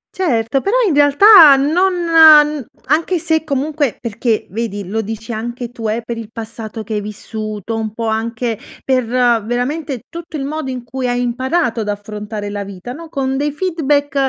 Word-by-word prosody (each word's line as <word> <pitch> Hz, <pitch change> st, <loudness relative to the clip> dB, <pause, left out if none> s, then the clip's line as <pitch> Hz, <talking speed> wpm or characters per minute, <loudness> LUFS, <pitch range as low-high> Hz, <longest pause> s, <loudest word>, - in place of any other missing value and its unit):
Certo! 260 Hz, -7 st, 0 dB
Però, 400 Hz, +5 st, 0 dB
in 325 Hz, -, +1 dB
realtà, 290 Hz, +2 st, +8 dB
non 320 Hz, +8 st, +2 dB, 0.9 s
anche 325 Hz, +6 st, +1 dB
se, 320 Hz, 0 st, 0 dB
comunque 285 Hz, -2 st, -1 dB
perché, 230 Hz, -1 st, -1 dB
vedi, 205 Hz, -3 st, -4 dB
lo 220 Hz, +3 st, -2 dB
dici 225 Hz, +2 st, -6 dB
anche 240 Hz, +2 st, -5 dB
tu, 230 Hz, -3 st, -4 dB
eh, 230 Hz, +2 st, -2 dB
per 235 Hz, 0 st, -4 dB
il 225 Hz, -1 st, -8 dB
passato 225 Hz, -1 st, -7 dB
che 215 Hz, +1 st, -6 dB
hai 210 Hz, -, -1 dB
vissuto. 215 Hz, +1 st, -6 dB
Un 220 Hz, -1 st, -3 dB
po' 230 Hz, 0 st, -3 dB
anche 225 Hz, +1 st, -2 dB, 0.3 s
per 255 Hz, -2 st, +1 dB
veramente 245 Hz, +3 st, 0 dB
tutto 335 Hz, -2 st, -7 dB
il 270 Hz, -, -3 dB
modo 305 Hz, -1 st, -4 dB
in 255 Hz, -2 st, -5 dB
cui 255 Hz, +1 st, -4 dB
hai 245 Hz, 0 st, 0 dB
imparato 245 Hz, +1 st, -1 dB
ad 210 Hz, -, -3 dB
affrontare 210 Hz, 0 st, -5 dB
la 205 Hz, 0 st, -4 dB
vita, 200 Hz, +5 st, -8 dB
no? 330 Hz, +2 st, -10 dB
Con 270 Hz, -3 st, -2 dB
dei 295 Hz, +1 st, -1 dB
feedback, 295 Hz, -4 st, -1 dB
245 Hz, 170 wpm, -17 LUFS, 220-290 Hz, 0.9 s, realtà